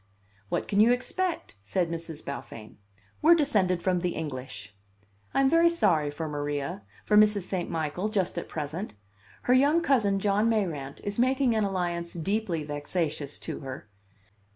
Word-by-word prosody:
'What - - -1
can 200 - +1
you 225 +3 +7
expect?' 320 - -2
said 165 - -1
Miss 165 0 -5
Beaufain; 115 -6 -8 0.4
'we're 330 +3 +7
descended 195 - +1
from 185 -1 +2
the 175 0 -2
English.' 130 -7 -6 0.6
I - - +2
am 270 - +4
very 330 +4 +5
sorry 185 - +2
for 155 +2 -4
Maria 145 +5 -3 0.2
for 210 - +2
Mrs. 210 -2 +5
St. 180 -1 -3
Michael 165 +5 -2
just 195 -4 0
at - - -9
present. 160 - -5 0.5
Her 250 - +3
young 285 +6 +5
cousin, 225 -11 +2
John 205 +3 +2
Mayrant, 165 -11 -2
is 205 +2 -4
making 260 0 +3
an 220 -2 +2
alliance 175 -3 -2
deeply 180 -1 -1
vexatious 145 0 -3
to - - -5
her. 130 -6 -8
185 Hz, 155 wpm, -28 LUFS, 150-220 Hz, 0.6 s, you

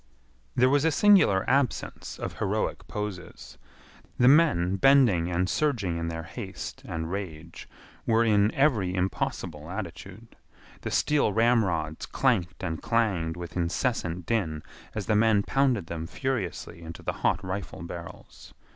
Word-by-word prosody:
There 125 - +4
was 140 +2 +3
a 160 - +4
singular 170 - +4
absence 135 -2 -1
of - - -6
heroic - - -2
poses. 105 -4 -7 0.6
The 125 - +5
men 130 - +4
bending 110 -8 +4
and 90 +1 0
surging 105 - 0
in 85 - -3
their 80 0 -4
haste 95 +1 -7
and 80 0 -4
rage 85 -4 -7 0.4
were 115 0 +4
in 105 -1 +3
every 110 -11 +2
impossible 85 -3 -3
attitude. 95 +4 -8 0.5
The - - -4
steel 145 -8 +2
ramrods 95 -9 +1
clanked 95 -10 0
and 80 -3 -3
clanged 95 -8 0
with 85 -1 -8
incessant 90 -1 -1
din 80 -9 -1 0.3
as - - -3
the 110 - +1
men 105 -1 +4
pounded 130 -8 +1
them 80 0 -5
furiously 110 - -4
into 80 0 -9
the - - -2
hot 95 - +1
rifle 95 -2 -5
barrels. 85 0 -10
95 Hz, 140 wpm, -27 LUFS, 85-120 Hz, 0.6 s, The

